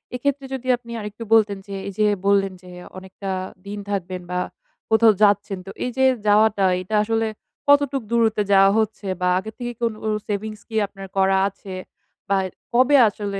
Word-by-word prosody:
এক্ষেত্রে 280 Hz, +2 st, -1 dB
যদি 255 Hz, -1 st, -5 dB
আপনি 235 Hz, -1 st, -13 dB
আরেকটু 210 Hz, +1 st, -7 dB
বলতেন 215 Hz, -3 st, +4 dB
যে, 200 Hz, -, -6 dB
এই 200 Hz, -, -5 dB
যে 215 Hz, -, +4 dB, 0.2 s
বললেন 195 Hz, -1 st, +3 dB
যে 180 Hz, -, -13 dB, 0.3 s
অনেকটা 190 Hz, +1 st, -7 dB, 0.4 s
দিন 205 Hz, +1 st, -5 dB
থাকবেন 185 Hz, -2 st, -3 dB
বা 180 Hz, -, 0 dB, 0.5 s
কোথাও 220 Hz, 0 st, +6 dB
যাচ্ছেন, 205 Hz, -1 st, +3 dB
তো 195 Hz, -, -8 dB
এই 250 Hz, -, -2 dB
যে 265 Hz, -, +4 dB, 0.2 s
যাওয়াটা 210 Hz, -1 st, +4 dB, 0.2 s
এটা 200 Hz, +4 st, -3 dB
আসলে 225 Hz, +1 st, 0 dB, 0.4 s
কতটুক 285 Hz, -1 st, +4 dB
দূরত্বে 225 Hz, -3 st, +2 dB
যাওয়া 195 Hz, 0 st, +6 dB
হচ্ছে 215 Hz, -2 st, -2 dB
বা 180 Hz, -, +2 dB
আগের 215 Hz, +3 st, -5 dB
থেকে 240 Hz, 0 st, -3 dB
কোনো 230 Hz, -2 st, -1 dB, 0.3 s
সেভিংস 210 Hz, +1 st, -4 dB
কি 225 Hz, -, -7 dB
আপনার 195 Hz, -1 st, -10 dB
করা 190 Hz, 0 st, +4 dB
আছে 195 Hz, 0 st, -11 dB, 0.6 s
বা 200 Hz, -, +3 dB, 0.4 s
কবে 260 Hz, +4 st, +5 dB
আসলে 205 Hz, -1 st, -4 dB
210 Hz, 170 wpm, -22 LUFS, 195-230 Hz, 0.6 s, কোথাও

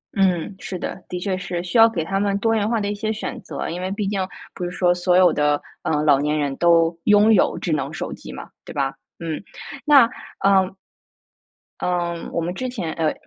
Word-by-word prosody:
嗯， 190 Hz, -1 st, +1 dB
是 185 Hz, -, -5 dB
的， 180 Hz, -, -6 dB
的 180 Hz, -, -3 dB
确 190 Hz, +1 st, -1 dB
是 180 Hz, -2 st, -4 dB
需 180 Hz, +6 st, -1 dB
要 225 Hz, 0 st, +8 dB
给 175 Hz, -8 st, -2 dB
他 195 Hz, +4 st, -1 dB
们 200 Hz, 0 st, +1 dB
多 225 Hz, +2 st, +1 dB
元 215 Hz, -1 st, +1 dB
化 230 Hz, -1 st, +1 dB
的 205 Hz, -, -2 dB
一 -, -, -1 dB
些 215 Hz, +1 st, -2 dB
选 220 Hz, -, -5 dB
择， -, -, -5 dB
因 175 Hz, +2 st, -4 dB
为 185 Hz, -, -2 dB
毕 200 Hz, 0 st, -2 dB
竟 195 Hz, -2 st, -1 dB, 0.3 s
不 180 Hz, -, -6 dB
是 175 Hz, -, -2 dB
说 180 Hz, 0 st, +2 dB
所 180 Hz, 0 st, +2 dB
有 185 Hz, -1 st, +6 dB
的， 150 Hz, 0 st, +2 dB, 0.2 s
呃， 150 Hz, -1 st, 0 dB
老 145 Hz, -3 st, +5 dB
年 150 Hz, +2 st, 0 dB
人 145 Hz, -2 st, -1 dB
都 170 Hz, -1 st, +4 dB
拥 210 Hz, +1 st, +6 dB
有 200 Hz, -, +3 dB
智 170 Hz, -, -3 dB
能 140 Hz, -3 st, -1 dB
手 -, -, -5 dB
机 -, -, -10 dB
嘛， -, -, -8 dB, 0.2 s
对 -, -, -10 dB
吧？ 135 Hz, -1 st, -1 dB, 0.3 s
嗯， 165 Hz, -1 st, -4 dB, 0.4 s
那 285 Hz, -5 st, +7 dB, 0.4 s
呃。 190 Hz, -1 st, +3 dB, 1.1 s
嗯， 175 Hz, -1 st, -2 dB
我 -, -, -1 dB
们 170 Hz, +2 st, -2 dB
之 255 Hz, +7 st, -4 dB
前， 185 Hz, -11 st, -4 dB
呃， 160 Hz, -2 st, 0 dB
180 Hz, 235 characters per minute, -22 LUFS, 165-200 Hz, 1.1 s, 要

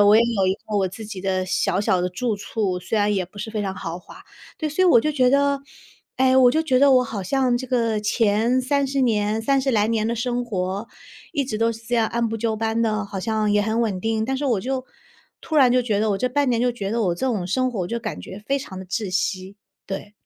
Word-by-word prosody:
我 205 Hz, +1 st, +7 dB
也 230 Hz, -, +6 dB
有 220 Hz, -5 st, +1 dB
一 190 Hz, -, +2 dB
个 210 Hz, 0 st, -5 dB
我 190 Hz, -1 st, +1 dB
自 215 Hz, +4 st, -9 dB
己 205 Hz, -3 st, -7 dB
的 185 Hz, -1 st, -1 dB
小 185 Hz, +1 st, 0 dB
小 190 Hz, -3 st, +1 dB
的 180 Hz, -, 0 dB
住 220 Hz, +5 st, -2 dB
处， 200 Hz, -3 st, -2 dB
虽 210 Hz, +5 st, -1 dB
然 205 Hz, 0 st, +2 dB
也 185 Hz, -2 st, 0 dB
不 205 Hz, +3 st, -15 dB
是 215 Hz, +2 st, -5 dB
非 215 Hz, -1 st, -3 dB
常 190 Hz, -1 st, -3 dB
豪 165 Hz, +2 st, -5 dB
华。 380 Hz, -, -15 dB, 0.3 s
对， 310 Hz, -, -2 dB
所 305 Hz, +6 st, 0 dB
以 -, -, +5 dB
我 240 Hz, -, +7 dB
就 305 Hz, +5 st, -1 dB
觉 255 Hz, -3 st, +3 dB
得 280 Hz, +1 st, +2 dB, 0.6 s
哎， 260 Hz, 0 st, +3 dB
我 255 Hz, -2 st, +6 dB
就 315 Hz, +5 st, +1 dB
觉 260 Hz, -5 st, +2 dB
得 280 Hz, 0 st, +6 dB
我 255 Hz, -1 st, +5 dB
好 210 Hz, -4 st, -5 dB
像 255 Hz, +3 st, +1 dB
这 260 Hz, -, -6 dB
个 230 Hz, -4 st, 0 dB
前 220 Hz, +3 st, +2 dB
30 275 Hz, 0 st, 0 dB
年 215 Hz, -2 st, +1 dB
30 270 Hz, +2 st, +1 dB
来 210 Hz, -3 st, +2 dB
年 220 Hz, -1 st, 0 dB
的 235 Hz, -, 0 dB
生 245 Hz, +1 st, -1 dB
活， 195 Hz, 0 st, -3 dB, 0.4 s
一 285 Hz, -4 st, 0 dB
直 215 Hz, -4 st, -4 dB
都 230 Hz, 0 st, +2 dB
是 225 Hz, 0 st, -7 dB
这 240 Hz, -, -1 dB
样 225 Hz, -2 st, +3 dB
按 235 Hz, 0 st, 0 dB
部 225 Hz, 0 st, -3 dB
就 220 Hz, -1 st, -1 dB
班 225 Hz, +1 st, -1 dB
的， 215 Hz, -2 st, 0 dB
好 200 Hz, -1 st, -6 dB
像 215 Hz, -1 st, 0 dB
也 205 Hz, -, +3 dB
很 220 Hz, +2 st, 0 dB
稳 200 Hz, -5 st, -1 dB
定。 220 Hz, +1 st, 0 dB
但 265 Hz, +2 st, -1 dB
是 285 Hz, -, -2 dB
我 225 Hz, -7 st, +1 dB
就 260 Hz, +2 st, -3 dB, 0.6 s
突 315 Hz, -, -3 dB
然 260 Hz, -4 st, +6 dB
就 250 Hz, 0 st, +3 dB
觉 215 Hz, -4 st, 0 dB
得 220 Hz, -, +1 dB
我 195 Hz, -, +1 dB
这 250 Hz, -, 0 dB
半 280 Hz, +2 st, +1 dB
年 235 Hz, -2 st, +1 dB
就 245 Hz, 0 st, +2 dB
觉 200 Hz, -4 st, -4 dB
得 230 Hz, 0 st, 0 dB
我 175 Hz, -3 st, +1 dB
这 265 Hz, -, -2 dB
种 205 Hz, -8 st, -1 dB
生 255 Hz, +7 st, 0 dB
活， 215 Hz, -6 st, -4 dB
我 175 Hz, -, -2 dB
就 235 Hz, +5 st, -3 dB
感 215 Hz, -3 st, -5 dB
觉 200 Hz, +2 st, -9 dB
非 275 Hz, +1 st, +1 dB
常 190 Hz, -8 st, -8 dB
的 190 Hz, -, -8 dB
窒 195 Hz, +1 st, -3 dB
息。 185 Hz, +1 st, -2 dB, 0.3 s
对。 195 Hz, +2 st, -6 dB
225 Hz, 280 characters per minute, -22 LUFS, 205-255 Hz, 0.6 s, 我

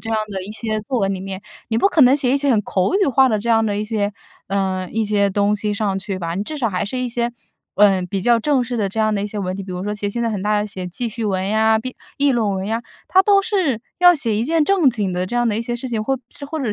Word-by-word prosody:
这 225 Hz, -, -6 dB
样 220 Hz, -, +1 dB
的 190 Hz, -2 st, -4 dB
一 195 Hz, -, -7 dB
些 215 Hz, 0 st, -3 dB
作 245 Hz, +4 st, -2 dB
文 195 Hz, -1 st, 0 dB
里 185 Hz, -, -6 dB
面， 195 Hz, 0 st, -6 dB, 0.3 s
你 225 Hz, 0 st, 0 dB
不 395 Hz, -, +4 dB
可 335 Hz, -, +1 dB
能 260 Hz, 0 st, +7 dB
写 265 Hz, -3 st, +1 dB
一 -, -, +4 dB
些 280 Hz, 0 st, +1 dB
很 220 Hz, -4 st, +3 dB
口 190 Hz, -, 0 dB
语 400 Hz, -, +2 dB
化 265 Hz, 0 st, +4 dB
的 215 Hz, -3 st, +1 dB
这 235 Hz, +3 st, -5 dB
样 225 Hz, -1 st, +4 dB
的 205 Hz, -2 st, -1 dB
一 210 Hz, -, -2 dB
些 210 Hz, -2 st, -1 dB, 0.4 s
呃， 190 Hz, -2 st, -1 dB
一 225 Hz, 0 st, 0 dB
些 205 Hz, -1 st, +1 dB
东 205 Hz, +1 st, +2 dB
西 210 Hz, 0 st, -2 dB
上 205 Hz, -2 st, -1 dB
去 190 Hz, 0 st, -4 dB
吧。 170 Hz, -2 st, -3 dB
你 195 Hz, -, -2 dB
至 300 Hz, +8 st, -6 dB
少 235 Hz, -, +1 dB
还 180 Hz, -3 st, -2 dB
是 250 Hz, +5 st, -4 dB
一 250 Hz, -1 st, -1 dB
些， 235 Hz, 0 st, -1 dB, 0.5 s
呃， 195 Hz, -2 st, +5 dB
比 185 Hz, +2 st, -3 dB
较 235 Hz, +3 st, +3 dB
正 275 Hz, 0 st, +2 dB
式 240 Hz, 0 st, -4 dB
的 205 Hz, -3 st, 0 dB
这 210 Hz, +4 st, -6 dB
样 215 Hz, 0 st, +2 dB
的 200 Hz, -, -1 dB
一 -, -, -2 dB
些 210 Hz, -, -5 dB
文 185 Hz, -2 st, -2 dB
体， 195 Hz, -, -5 dB
比 190 Hz, -, -9 dB
如 180 Hz, +1 st, -4 dB
说 210 Hz, -, -2 dB
写 205 Hz, -1 st, -3 dB
现 235 Hz, -, -4 dB
在 230 Hz, -, +1 dB
很 205 Hz, -3 st, -3 dB
大 210 Hz, -, -1 dB
家 -, -, -1 dB
写 185 Hz, -3 st, -6 dB
记 235 Hz, +7 st, -3 dB
叙 225 Hz, +1 st, -5 dB
文 190 Hz, -2 st, -1 dB
呀， 220 Hz, +1 st, +3 dB
闭 255 Hz, +3 st, -6 dB, 0.2 s
议 285 Hz, 0 st, +3 dB
论 225 Hz, -4 st, +1 dB
文 190 Hz, 0 st, -3 dB
呀， 225 Hz, +2 st, -2 dB, 0.3 s
它 375 Hz, +1 st, +5 dB
都 400 Hz, 0 st, +5 dB
是 365 Hz, -, 0 dB, 0.2 s
要 355 Hz, 0 st, +8 dB
写 235 Hz, -8 st, 0 dB
一 225 Hz, -, 0 dB
件 320 Hz, +1 st, +2 dB
正 370 Hz, -4 st, +3 dB
经 205 Hz, -6 st, -2 dB
的 180 Hz, +1 st, -1 dB
这 240 Hz, -, -6 dB
样 240 Hz, -1 st, +2 dB
的 210 Hz, -, 0 dB
一 230 Hz, -, -1 dB
些 240 Hz, +1 st, -3 dB
事 255 Hz, +2 st, -6 dB
情 225 Hz, -3 st, -2 dB
或 270 Hz, +5 st, 0 dB
者 260 Hz, +3 st, -11 dB
或 320 Hz, +1 st, -4 dB
者 225 Hz, -6 st, -1 dB
220 Hz, 335 characters per minute, -20 LUFS, 200-250 Hz, 0.5 s, 要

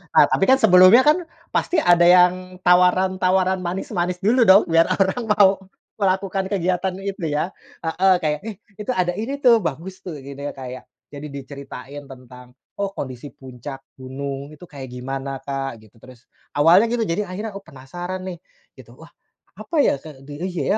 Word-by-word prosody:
Ah, -, -, +8 dB
tapi -, -, +1 dB
kan 260 Hz, -, +7 dB
sebelumnya 200 Hz, 0 st, +6 dB
kan 320 Hz, +4 st, +2 dB, 0.2 s
pasti 350 Hz, -, 0 dB
ada 175 Hz, -1 st, +5 dB
yang 180 Hz, +1 st, +4 dB
tawaran-tawaran 185 Hz, +1 st, +3 dB
manis-manis 180 Hz, 0 st, -3 dB
dulu 235 Hz, +3 st, +3 dB
dong, 190 Hz, +2 st, +7 dB
biar 165 Hz, 0 st, +4 dB
orang 190 Hz, +5 st, 0 dB
mau 200 Hz, -2 st, +6 dB, 0.5 s
melakukan 195 Hz, 0 st, 0 dB
kegiatan 185 Hz, -1 st, -1 dB
itu 195 Hz, -4 st, -4 dB
ya. 150 Hz, +4 st, -2 dB, 0.3 s
Heeh, 180 Hz, +4 st, +2 dB
kayak, 150 Hz, -1 st, 0 dB
"Eh, 220 Hz, -, -6 dB, 0.2 s
itu 210 Hz, +4 st, -3 dB
ada 180 Hz, -1 st, +1 dB
ini 250 Hz, +6 st, -3 dB
tuh, 235 Hz, -3 st, +6 dB
bagus 185 Hz, +2 st, -5 dB
tuh." 180 Hz, -4 st, -8 dB
Jadinya 140 Hz, +1 st, -8 dB
kayak, 130 Hz, -1 st, -9 dB, 0.2 s
jadi 145 Hz, +1 st, -8 dB
diceritain 140 Hz, 0 st, -9 dB
tentang, 125 Hz, -1 st, -14 dB, 0.2 s
oh 200 Hz, -1 st, -2 dB
kondisi 130 Hz, +1 st, -7 dB
puncak 130 Hz, +1 st, -9 dB, 0.2 s
gunung 135 Hz, +2 st, -6 dB
itu 150 Hz, -, -17 dB
kayak 140 Hz, -4 st, -9 dB
gimana 135 Hz, +2 st, -5 dB
Kak, 135 Hz, -2 st, -4 dB
gitu. 110 Hz, -, -22 dB
Terus, 125 Hz, -1 st, -16 dB, 0.3 s
awalnya 175 Hz, +9 st, +5 dB
gitu 240 Hz, -1 st, 0 dB
jadi 205 Hz, +1 st, -1 dB
akhirnya, 210 Hz, +5 st, -6 dB
oh 200 Hz, -, -8 dB
penasaran 175 Hz, +5 st, -8 dB
nih 175 Hz, -2 st, -7 dB, 0.4 s
gitu, -, -, -15 dB
wah -, -, -15 dB, 0.5 s
apa -, -, -7 dB
ya, 285 Hz, -, +3 dB
kek 135 Hz, -3 st, -13 dB
di 145 Hz, -, -8 dB
eh 185 Hz, -, -1 dB
iya 175 Hz, -, -3 dB
175 Hz, 170 wpm, -21 LUFS, 140-190 Hz, 0.5 s, Ah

